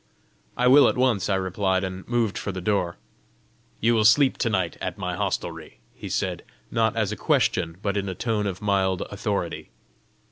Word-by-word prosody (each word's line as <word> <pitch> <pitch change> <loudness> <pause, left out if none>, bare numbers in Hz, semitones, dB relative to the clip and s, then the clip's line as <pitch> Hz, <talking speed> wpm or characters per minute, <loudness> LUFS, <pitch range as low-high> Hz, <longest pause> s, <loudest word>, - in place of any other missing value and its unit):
"I 125 - +1
will 135 +1 +7
at - - -2
once!" 125 -8 +1
I 95 - +2
replied, 95 0 0
and 95 0 -6
moved 115 -4 0
for 100 - -3
the 95 - -5
door. 90 -2 -1 0.8
"You 115 +2 +3
will 110 -2 +3
sleep 130 +5 +5
to 115 - +1
night 95 -6 -1
at - - -4
my - - -3
hostelry!" - - -4 0.2
he - - -8
said - - -2 0.3
not 115 -1 +1
as 110 -3 0
a - - -2
question, 80 -4 +1
but 100 -1 -1
in 100 -1 -1
a 95 - -4
tone 105 0 -1
of 95 +1 -5
mild 95 -3 +1
authority. - - -3
100 Hz, 185 wpm, -25 LUFS, 95-115 Hz, 0.8 s, will